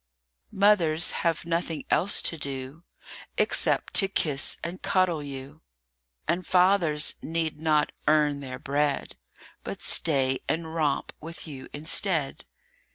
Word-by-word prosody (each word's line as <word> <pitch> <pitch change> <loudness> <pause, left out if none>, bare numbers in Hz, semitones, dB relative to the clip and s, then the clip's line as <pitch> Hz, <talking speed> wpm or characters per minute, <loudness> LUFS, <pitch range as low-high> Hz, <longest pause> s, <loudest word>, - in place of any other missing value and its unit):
MOTHERS 180 -5 +3
have 165 -1 -1
nothing 165 -1 -2
else 200 +3 +2
to - - +2
do 140 +1 -6 0.5
Except - - +1
to 195 - +4
kiss 150 -7 +1
and 175 +2 -5
cuddle 185 -4 +1
you; 140 +2 -9 0.7
And 175 +2 0
fathers 180 -5 +3
need 160 -1 -3
not 155 -2 +2 0.2
"earn 150 -2 +3
their 130 -2 -6
bread," 145 +1 -1 0.5
But - - -6
stay 135 -4 +2
and 160 +2 -2
romp 155 -4 -1
with 165 +2 -7
you 135 -4 -9
instead. 155 0 0
155 Hz, 120 wpm, -27 LUFS, 145-170 Hz, 0.7 s, to